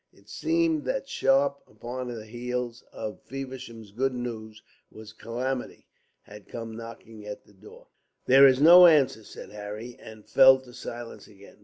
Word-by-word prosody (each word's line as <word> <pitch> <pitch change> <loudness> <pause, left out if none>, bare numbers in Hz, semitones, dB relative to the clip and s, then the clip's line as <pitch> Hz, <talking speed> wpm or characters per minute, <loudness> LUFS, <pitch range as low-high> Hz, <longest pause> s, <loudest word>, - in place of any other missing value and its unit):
It - - -24
seemed 330 -2 0
that - - -3
sharp 140 +1 +1
upon 120 +4 -7
the 115 -3 -7
heels 120 +1 -5
of 110 -1 -7
Feversham's 130 -5 -9
good 130 +4 -1
news 110 -3 -7 0.6
calamity 125 +2 -5 0.4
had 105 0 -14
come 115 -1 -7
knocking 115 -2 -11
at 105 - -8
the 105 - -22
door. 100 +2 -16 0.4
"There 135 +2 +7
is 130 -1 +3
no 175 +4 +9
answer," 140 -8 +3
said - - -12
Harry, 105 +3 -8
and 110 -1 -13
fell 130 0 +7
to 125 -2 -16
silence 120 0 -9
again. 100 -1 -17
120 Hz, 150 wpm, -26 LUFS, 110-135 Hz, 0.6 s, no